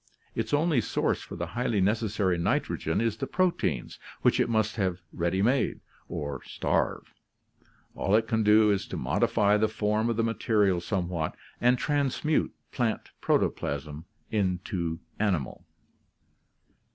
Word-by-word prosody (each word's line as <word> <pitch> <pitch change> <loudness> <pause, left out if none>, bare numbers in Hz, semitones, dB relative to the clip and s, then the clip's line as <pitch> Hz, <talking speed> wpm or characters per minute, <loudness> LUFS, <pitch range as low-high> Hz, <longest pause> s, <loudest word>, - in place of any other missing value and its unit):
Its - - -2
only 150 -3 +3
source - - 0
for - - -8
the 85 - -3
highly 120 -3 0
necessary 105 -2 +1
nitrogen 85 -1 0
is 115 -2 +1
the - - -3
proteins, 170 - 0 0.2
which - - +4
it - - +2
must 110 -2 +1
have 95 -4 -1
ready 85 +3 0
made, 130 +4 +2 0.3
or 70 -3 -4
starve; - - -1 0.8
all 95 - +1
it 110 0 +2
can 110 -1 +1
do 105 0 +5
is 100 - -1
to - - -5
modify 105 0 +2
the 110 +1 +3
form 110 +1 0
of 115 - -1
the 115 - +2
material 105 -5 +2
somewhat, 85 -3 -2 0.3
and 125 +1 +4
transmute 145 +2 +1 0.2
plant 120 -4 -1
protoplasm 75 +3 -1 0.3
into 90 -4 -1 0.2
animal. 95 - -1
105 Hz, 135 wpm, -28 LUFS, 90-115 Hz, 0.8 s, do